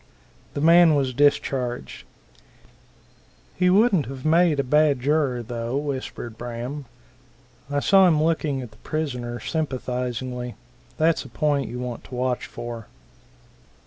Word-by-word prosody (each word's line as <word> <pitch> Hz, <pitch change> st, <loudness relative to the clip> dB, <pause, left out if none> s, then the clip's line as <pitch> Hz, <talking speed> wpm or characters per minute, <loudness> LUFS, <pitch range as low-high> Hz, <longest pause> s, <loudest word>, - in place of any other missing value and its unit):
The 145 Hz, -, -2 dB
man 165 Hz, 0 st, +6 dB
was 135 Hz, -3 st, 0 dB
discharged. 130 Hz, -, 0 dB, 1.5 s
"He 180 Hz, 0 st, +3 dB
wouldn't 190 Hz, -, +4 dB
have 130 Hz, +1 st, -8 dB
made 165 Hz, -1 st, +4 dB
a -, -, +2 dB
bad 150 Hz, 0 st, +3 dB
juror, 135 Hz, -3 st, +1 dB
though," 115 Hz, +2 st, -3 dB
whispered 130 Hz, -5 st, -5 dB
Braham. 120 Hz, +4 st, -5 dB, 0.8 s
"I 145 Hz, 0 st, 0 dB
saw 190 Hz, +2 st, +6 dB
him 155 Hz, -3 st, +3 dB
looking 155 Hz, -5 st, 0 dB
at 120 Hz, -, -10 dB
the 105 Hz, -, -20 dB
prisoner 125 Hz, -5 st, -4 dB
sympathizingly. 125 Hz, -3 st, -3 dB, 0.4 s
That's 160 Hz, +1 st, +2 dB
a 135 Hz, -, -12 dB
point 140 Hz, +1 st, 0 dB
you 125 Hz, -, -6 dB
want 125 Hz, -2 st, -5 dB
to 125 Hz, -, -9 dB
watch 125 Hz, 0 st, -1 dB
for." 120 Hz, -2 st, -7 dB
135 Hz, 130 wpm, -24 LUFS, 125-155 Hz, 1.5 s, man